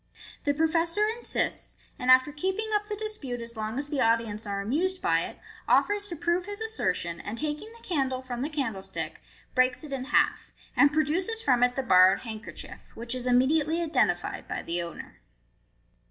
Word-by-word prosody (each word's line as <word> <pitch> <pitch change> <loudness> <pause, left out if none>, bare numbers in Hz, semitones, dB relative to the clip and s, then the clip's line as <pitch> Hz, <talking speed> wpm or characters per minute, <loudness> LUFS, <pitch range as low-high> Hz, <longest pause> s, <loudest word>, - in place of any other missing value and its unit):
The 285 - +3
professor 330 +5 +2
insists, 460 +2 0 0.2
and 250 -1 -2
after 255 +3 +6
keeping 380 +8 -2
up 415 0 +1
the 420 - -3
dispute 415 - -3
as 235 0 -7
long 220 +2 -3
as 285 +1 -2
the 290 -2 -1
audience 225 -2 +1
are 200 0 -2
amused 330 - 0
by - - +2
it, - - -9 0.3
offers 410 0 +3
to 345 - -4
prove 345 +3 0
his 410 0 -6
assertion, 445 - -2
and 215 +3 -6
taking 305 - -3
the 465 0 -16
candle 265 -6 0
from 245 -1 -5
the 285 - -1
candlestick, 230 -11 -4 0.3
breaks 255 +1 +2
it 295 -2 -7
in 260 -1 -3
half, 295 - +1 0.2
and 285 - +6
produces 340 +9 0
from 250 -3 +3
it 245 0 +3
the 270 - -1
borrowed 185 -5 +6
handkerchief, 220 -2 -9
which 235 +1 -3
is 255 -1 -4
immediately 295 +6 +3
identified 335 -2 0
by - - -4
the 175 +1 -2
owner. 170 0 -9
285 Hz, 180 wpm, -28 LUFS, 240-350 Hz, 0.3 s, after